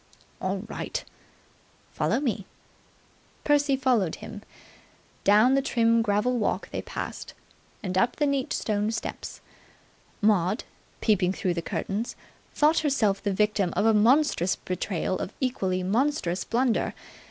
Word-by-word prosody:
"All 190 +1 -1
right." - - -4 0.9
"Follow - - 0
me." 230 -8 -2 1.0
Percy 290 -1 +3
followed 245 -10 +1
him. 205 - -9 0.8
Down 215 +6 +5
the 275 - +3
trim 230 -3 +3
gravel 225 +3 +1
walk 215 - -1
they - - -3
passed, - - -6 0.5
and 185 -2 -3
up 235 +6 +2
the 295 - +1
neat 280 -2 0
stone 210 -1 0
steps. 225 - -5 0.8
Maud, 205 0 +2 0.4
peeping 190 -4 +2
through 190 -3 -1
the 170 - -2
curtains, 205 +6 -3 0.4
thought 305 +2 +4
herself 225 -10 +1
the 205 - -1
victim 205 -2 +1
of - - +2
a 225 - +5
monstrous 225 - +3
betrayal 185 0 -2
or - - -3
equally 190 -8 -1
monstrous 205 -3 0
blunder. 240 -1 +1
215 Hz, 130 wpm, -26 LUFS, 190-255 Hz, 1.0 s, Down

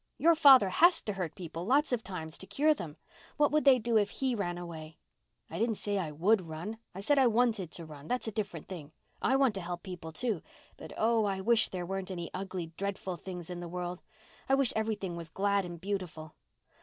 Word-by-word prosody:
Your 335 +1 +5
father 270 -10 +8
has 345 - +5
to 210 - -2
hurt 180 -5 -4
people 170 -1 -6
lots 275 +9 +3
of 240 - +1
times 160 -4 -6
to 190 - -10
cure 290 +10 +3
them. 160 - -7 0.4
What 295 -1 +4
would 305 0 +2
they 270 -2 +8
do 230 -1 +2
if 205 - +1
he 265 -2 -1
ran 175 -6 -2
away?" 160 -3 -8 0.5
"I - - -6
didn't 230 -1 +1
say 205 -1 -2
I 170 -5 -2
would 180 +4 +2
run. 170 +8 -6 0.2
I 195 - -5
said 285 +7 +3
I 260 - +6
wanted 225 -6 +2
to 170 - -7
run. 150 -1 -11
That's 250 -1 -1
a - - -1
different 200 -7 -4
thing. 160 -5 -8 0.3
I 265 - +3
want 270 -4 +4
to 195 - -4
help 175 0 -5
people, 180 -4 -7
too. 205 +2 -2 0.3
But - - -10
oh, 225 -1 +3
I 195 -1 -1
wish 230 +3 +3
there 180 -2 -4
weren't 195 +1 -4
any 175 -3 -5
ugly, 185 -3 -5
dreadful 195 -2 -3
things 180 0 -7
in 175 - -5
the 175 -1 -6
world. 180 0 -4 0.5
I 270 - +6
wish 270 -3 +2
everything 210 -5 -2
was 165 -1 -7
glad 200 +2 +1
and 175 -1 -7
beautiful." 180 -5 -4
195 Hz, 220 wpm, -31 LUFS, 175-225 Hz, 0.5 s, father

